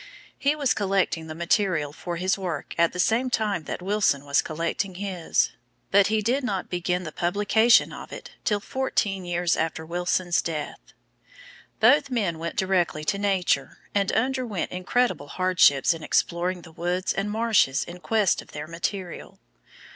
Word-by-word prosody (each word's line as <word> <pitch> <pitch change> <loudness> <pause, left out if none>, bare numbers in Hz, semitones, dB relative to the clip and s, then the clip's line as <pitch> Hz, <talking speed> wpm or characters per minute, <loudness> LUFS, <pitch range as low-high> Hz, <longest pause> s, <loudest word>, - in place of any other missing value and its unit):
He 285 +2 +2
was 285 -4 +1
collecting 190 -5 0
the 155 - -7
material 170 -3 0
for 175 +2 -5
his 185 +2 +1
work 175 -7 -4
at 170 0 +3
the - - -8
same 225 +8 +2
time 210 -9 -1
that 180 - -5
Wilson 195 -8 +1
was 140 -1 +3
collecting 170 +5 -3
his, 185 -3 0 0.4
but 200 0 +5
he 215 0 0
did 255 +6 +1
not 195 -7 -3
begin 180 0 -1
the 155 - -6
publication 205 +8 +3
of - - -9
it - - -9
till 210 -1 +1
fourteen 205 -6 -1
years 175 0 +1
after 160 0 -2
Wilson's 175 +1 0
death. 155 -3 -4 1.0
Both 290 -1 +5
men 200 -10 -1
went 170 +1 -4
directly 180 -5 0
to 200 +2 0
Nature 185 -9 0 0.2
and 200 -1 +1
underwent 250 -5 -1
incredible 185 - 0
hardships 180 -5 +3
in 165 - -8
exploring 175 +3 0
the 165 - -13
woods 175 +3 -1
and 200 +1 -2
marshes 215 -11 +2
in 175 +1 -10
quest 210 0 +1
of - - -17
their 150 0 -5
material. 175 +3 -5
185 Hz, 160 wpm, -25 LUFS, 170-205 Hz, 1.0 s, but